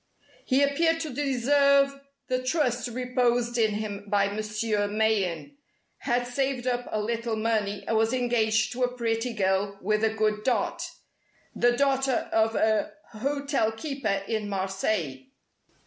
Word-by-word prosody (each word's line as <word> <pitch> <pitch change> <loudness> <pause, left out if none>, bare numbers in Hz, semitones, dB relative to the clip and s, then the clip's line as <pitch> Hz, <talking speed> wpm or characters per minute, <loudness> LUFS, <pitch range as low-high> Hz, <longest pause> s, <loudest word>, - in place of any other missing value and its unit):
He 265 +2 +3
appeared 325 +4 +2
to 310 -5 -4
deserve 275 +1 +3 0.3
the 255 0 0
trust 255 -3 0
reposed 245 -1 0
in 215 -2 +2
him 205 -1 -4
by 200 0 +2
Monsieur 215 0 -1
Mayen; 215 - 0 0.4
had 245 +1 0
saved 260 0 -2
up 245 -1 -1
a 215 - -1
little 230 +1 -2
money 215 -2 -1
and 225 - 0
was 225 +1 +2
engaged 230 -4 +1
to 250 - -5
a 250 0 0
pretty 230 +1 -1
girl 200 -1 0
with 215 +2 0
a 220 - +4
good 215 -1 0
dot, 255 - 0 0.7
the 240 0 +3
daughter 270 -2 +1
of 225 0 +2
a 215 -1 +1 0.2
hotel 275 0 -1
keeper 225 -5 -2
in 215 -2 -2
Marseilles. 190 -8 -2
230 Hz, 140 wpm, -27 LUFS, 215-255 Hz, 0.7 s, a